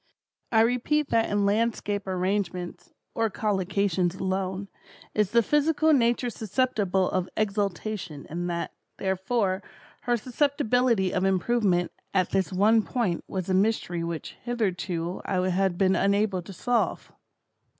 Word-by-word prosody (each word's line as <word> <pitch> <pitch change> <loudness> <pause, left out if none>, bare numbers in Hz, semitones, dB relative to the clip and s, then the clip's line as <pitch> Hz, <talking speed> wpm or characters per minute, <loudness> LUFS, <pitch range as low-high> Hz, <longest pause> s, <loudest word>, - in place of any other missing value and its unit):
I 220 -2 +5
repeat 250 +6 +1
that 225 -1 +2
in 205 0 +1
landscape 205 -1 0
arrangements, 185 -1 -2 0.2
or 225 -1 +1
collocations 190 -3 0
alone, 190 +1 -2 0.5
is 210 -3 +2
the 235 +2 +4
physical 310 +3 +3
Nature 240 -2 +2
susceptible 210 -5 0
of 185 -1 -1
"exaltation" 200 -5 -2
and 175 +2 -3
that, 170 0 -3 0.2
therefore, 190 +1 0 0.4
her 240 -1 +2
susceptibility 245 -5 +1
of 185 - 0
improvement 190 -1 +2 0.2
at 185 -2 +2
this 195 0 0
one 210 +4 +4
point, 215 -6 -1
was 185 -2 -4
a 190 - 0
mystery 190 -4 +1
which, 170 -2 -5
hitherto 185 -7 -2
I 185 -1 0
had 185 -1 +1
been 190 0 +3
unable 200 -1 +2
to 185 - -11
solve. 240 +5 -1
200 Hz, 130 wpm, -26 LUFS, 185-230 Hz, 0.5 s, I